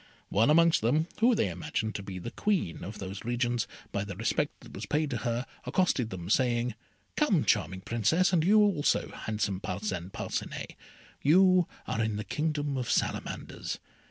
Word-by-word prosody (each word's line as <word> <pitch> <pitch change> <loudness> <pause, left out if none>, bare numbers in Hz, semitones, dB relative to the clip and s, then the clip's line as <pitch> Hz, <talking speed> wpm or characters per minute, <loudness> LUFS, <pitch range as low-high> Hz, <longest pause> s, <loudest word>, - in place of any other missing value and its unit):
One 110 +7 +3
amongst 165 +2 +5
them, 150 +9 +2
whom 235 +2 +5
they 105 - +2
imagined 95 +5 -3
to - - -4
be 95 -1 -7
the 115 +6 -6
Queen 195 - -1
of 105 +4 -6
those 95 0 -6
regions, 120 0 0 0.2
by 100 - -1
the 100 -2 -6
respect 120 +8 -1
that - - -13
was - - -6
paid 150 0 0
to 125 - -1
her, 120 +2 -1 0.2
accosted 130 -4 +1
them, 90 -4 -6
saying, 120 +2 +2 0.4
"Come, - - +2
charming 95 +4 +1
Princess, 160 - +2
and 165 -3 +4
you 205 +5 +5
also, 195 -8 +2
handsome 105 -3 -2
Parcin 90 -2 -3
Parcinet; - - -4 0.5
you 185 +3 +5 0.2
are 115 - -1
in 110 -1 -1
the 105 - -3
Kingdom 145 +4 -1
of 125 -2 -3
Salamanders. - - -2
120 Hz, 170 wpm, -29 LUFS, 100-155 Hz, 0.5 s, amongst